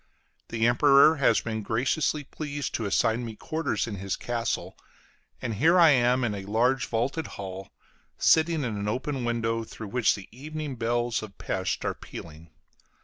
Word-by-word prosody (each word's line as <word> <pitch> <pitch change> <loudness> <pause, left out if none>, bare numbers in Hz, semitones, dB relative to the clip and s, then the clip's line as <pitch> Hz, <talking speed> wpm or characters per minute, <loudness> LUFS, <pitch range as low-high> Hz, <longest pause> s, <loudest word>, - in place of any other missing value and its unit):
The 115 -1 0
Emperor 140 +5 +6
has 135 - +3
been 110 -1 -3
graciously 135 +7 0
pleased 145 0 -5
to 115 - -2
assign 115 +4 +1
me 115 -2 -6
quarters 160 +8 -2
in 110 -4 -5
his 95 0 -3
castle; 115 -6 -3 0.7
and 115 - -2
here 165 - +5
I 165 -3 +8
am 125 -1 +3
in 115 -3 0
a 100 -1 -5
large 120 +6 +1
vaulted 125 +8 -1
hall, 95 0 -7 0.5
sitting 160 -1 +3
at 120 - -2
an 105 -1 -3
open 130 +3 -2
window 115 -1 -1
through 110 -1 -9
which 125 +2 +2
the 100 - -10
evening 150 +3 -6
bells 120 0 0
of 105 -3 -10
Pesth 95 -1 -2
are - - 0
pealing. 80 0 -11
120 Hz, 165 wpm, -27 LUFS, 110-140 Hz, 0.7 s, I